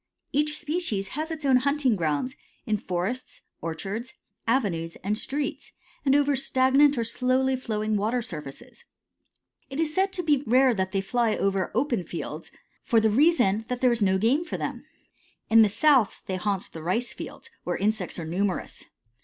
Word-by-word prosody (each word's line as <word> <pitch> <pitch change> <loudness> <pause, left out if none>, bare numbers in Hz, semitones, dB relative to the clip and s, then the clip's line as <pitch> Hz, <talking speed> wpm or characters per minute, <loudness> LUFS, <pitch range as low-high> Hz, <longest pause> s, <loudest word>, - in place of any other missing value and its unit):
Each 300 +1 +1
species 290 - -2
has 310 +8 -4
its 315 -3 -5
own 265 -2 +5
hunting 280 -2 +2
grounds 165 - -1 0.3
in 215 -3 +1
forests, 190 +9 -4 0.2
orchards, 195 +10 -5 0.3
avenues, 185 -10 0
and 205 +2 0
streets, 280 +6 -4 0.3
and 275 -1 +3
over 285 -1 +3
stagnant 270 +2 +4
or 235 - +1
slowly 255 +3 +1
flowing 215 -4 -2
water 225 +4 0
surfaces. 150 - -9 0.9
It 270 +2 -5
is 315 -2 0
said 380 +2 +2
to 360 - -2
be 295 -4 +2
rare 255 +2 +5
that 190 -3 -2
they 195 - 0
fly 230 +2 +1
over 195 -1 0
open 240 -6 +1
fields, 160 -1 -6 0.3
for 230 - +3
the 220 -1 +2
reason 245 - +3
that 250 0 -3
there 250 -1 +4
is 235 -2 0
no 190 -1 +3
game 240 - +2
for - - -5
them. - - -4 0.7
In 225 0 +8
the 215 - +5
South 265 -1 +3
they 190 - -3
haunt 195 0 -2
the 160 - -7
rice 225 +9 -1
fields, - - -9
where - - -2
insects 205 -2 -1
are 165 - -4
numerous. 185 +4 -2
230 Hz, 170 wpm, -26 LUFS, 195-270 Hz, 0.9 s, In